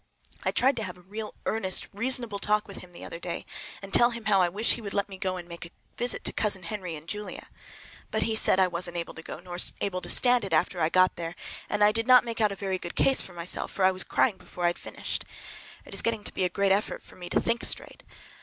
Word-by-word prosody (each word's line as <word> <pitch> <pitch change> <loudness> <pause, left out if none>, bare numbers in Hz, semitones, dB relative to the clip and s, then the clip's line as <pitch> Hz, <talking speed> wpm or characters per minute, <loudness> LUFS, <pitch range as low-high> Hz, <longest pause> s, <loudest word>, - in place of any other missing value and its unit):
I - - 0
tried 265 +2 +3
to 220 - -2
have 180 -2 -6
a - - -16
real 210 +4 -6
earnest 190 -4 +1
reasonable 235 -1 +1
talk 210 +1 +1
with 200 - -9
him 180 - -11
the 175 - -10
other 170 - -7
day, 170 -1 -5 0.4
and 195 - -8
tell 240 - +7
him 235 -2 -7
how 195 -2 +4
I 175 - +3
wish 210 +6 +3
he 235 - -5
would 200 -2 -5
let 200 -1 +1
me 195 - -8
go 185 -1 -1
and 175 -1 -8
make 170 -1 -8
a 170 - -9 0.3
visit 245 +1 0
to - - 0
Cousin 205 -4 0
Henry 180 -2 -5
and 155 +1 -10
Julia. 210 +3 -5 0.6
But 220 - 0
he 220 0 0
said 195 - +3
I 190 - +6
wasn't 175 0 -3
able 170 -1 -4
to 160 - -9
go, 160 - -7
nor 175 0 -7 0.2
able 185 -2 -2
to - - -7
stand 245 -2 +5
it 195 - -4
after 175 +2 +2
I 160 - +3
got 185 +1 +4
there; 170 0 -5 0.3
and 210 0 +2
I 210 - +7
did 225 +2 -1
not 250 -1 +8
make 230 -1 -3
out 210 -1 +4
a - - -3
very 190 -1 -2
good 175 - -7
case 270 - +4
for 185 - -10
myself, 170 +1 -2
for 190 - +1
I 190 - +6
was 185 0 -1
crying 215 -7 +2
before 180 -1 -8
I - - +5
had - - -16
finished. - - -3 0.6
It - - -8
is - - +2
getting 225 -2 -1
to - - -4
be 185 - 0
a - - +1
great 200 +1 +1
effort 200 +2 0
for - - -16
me 175 -1 -8
to - - +3
think 230 0 0
straight. - - -3
195 Hz, 275 wpm, -28 LUFS, 180-220 Hz, 0.6 s, not